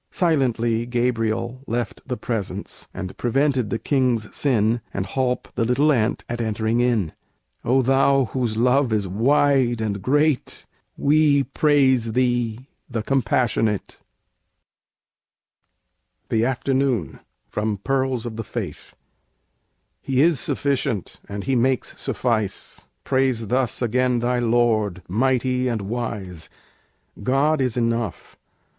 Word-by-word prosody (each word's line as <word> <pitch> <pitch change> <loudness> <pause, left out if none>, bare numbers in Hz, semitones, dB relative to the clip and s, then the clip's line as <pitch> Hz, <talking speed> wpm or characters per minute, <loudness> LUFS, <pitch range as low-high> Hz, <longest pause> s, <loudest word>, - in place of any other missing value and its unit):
Silently 120 -8 +1
Gabriel 120 0 -1
left 120 -2 -3
The 125 - -3
Presence, 110 -5 -4
and 95 -1 -6
prevented 130 -1 +1
the 115 - -1
king's 125 -5 0
sin, 115 -4 +1
And 95 - -3
holp 125 +5 -1
the 115 - 0
little 135 +6 +3
ant 120 -3 0
at 120 0 -3
entering 110 +1 0
in. 115 -9 +1 0.5
O 130 +2 +3
Thou 135 +1 +3
whose 120 -4 -1
love 125 +2 +3
is 105 -3 0
wide 125 +3 +2
and 100 -3 -2
great, 145 +4 +1 0.3
We 145 -1 +4
praise 130 -7 +2
Thee, 120 -1 0 0.2
"The 115 -4 -3
Compassionate" 115 -5 0 2.3
THE 110 0 +2
AFTERNOON 130 - 0 0.3
From 105 0 -2
'Pearls 130 +2 -1
of 115 -2 -5
the 115 - -3
Faith' - - -6 1.1
He 130 -1 -1
is 165 -5 +3
sufficient, 135 - -1
and 100 0 -5
He 135 - 0
makes 130 +1 0
suffice; 110 - -2 0.2
Praise 130 -5 0
thus 125 -1 0
again 125 +1 +2
thy 120 +1 0
Lord, 115 -5 +1
mighty 125 +4 +1
and 115 -4 -1
wise. 100 -6 -5 0.7
God 140 +5 +2
is 125 -2 -1
enough! 115 -4 -2
120 Hz, 115 wpm, -23 LUFS, 110-130 Hz, 2.3 s, We